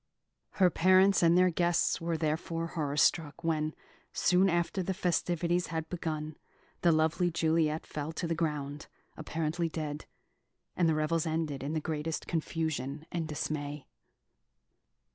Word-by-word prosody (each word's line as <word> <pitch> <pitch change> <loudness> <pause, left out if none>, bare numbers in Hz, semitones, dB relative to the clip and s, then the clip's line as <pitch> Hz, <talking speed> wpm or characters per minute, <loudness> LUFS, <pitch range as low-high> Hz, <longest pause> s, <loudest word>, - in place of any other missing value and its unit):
Her 185 -2 +4
parents 185 +3 +5
and 170 0 +5
their 180 0 +5
guests 170 0 +1
were 165 -1 -1
therefore 165 +1 -1
horror 150 -4 -2
struck 155 0 +2
when, 155 -1 0 0.4
soon 185 +2 +3
after 175 +2 0
the 185 +1 -2
festivities 175 -1 0
had 160 0 -4
begun, 155 -3 -4 0.4
the 170 - +5
lovely 160 +3 +2
Juliet 160 -1 +1
fell 150 +1 -4
to 170 - -3
the 165 - 0
ground, 150 -3 -3 0.3
apparently 160 +1 -2
dead; 155 -2 -5 0.7
and 170 -2 +3
the 160 - +2
revels 155 +2 0
ended 155 -3 -2
in 140 +3 -3
the 160 - 0
greatest 155 +1 -3
confusion 155 -3 -2
and 165 -2 -2
dismay. 150 -1 -4
160 Hz, 140 wpm, -31 LUFS, 155-170 Hz, 0.7 s, parents